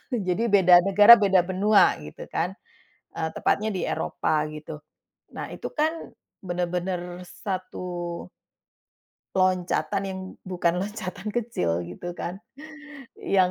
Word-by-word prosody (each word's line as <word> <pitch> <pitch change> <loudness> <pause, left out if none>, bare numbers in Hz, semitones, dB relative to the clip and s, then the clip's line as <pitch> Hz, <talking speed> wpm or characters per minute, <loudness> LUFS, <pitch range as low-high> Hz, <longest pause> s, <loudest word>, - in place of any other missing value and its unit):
Jadi 215 0 0
beda 185 -4 +7
negara, 205 +4 +9
beda 190 -3 +4
benua, 195 +3 +4
gitu 75 0 -9
kan. - - -1 0.6
Eee, 160 - -2
tepatnya 215 +2 +1
di 185 - -2
Eropa, 155 -1 -1
gitu. 155 0 -8 0.6
Nah, - - -6
itu - - -6
kan, 310 +1 +2 0.5
bener-bener 180 0 -3
satu 180 -3 -5 1.1
loncatan, 185 -1 +1
yang 190 0 -5 0.2
bukan 180 -1 0
loncatan 205 0 -5
kecil, 90 - -1
gitu 90 - -7
kan. 190 +4 -5 0.8
Yang 185 -2 +2
185 Hz, 110 wpm, -25 LUFS, 175-195 Hz, 1.1 s, negara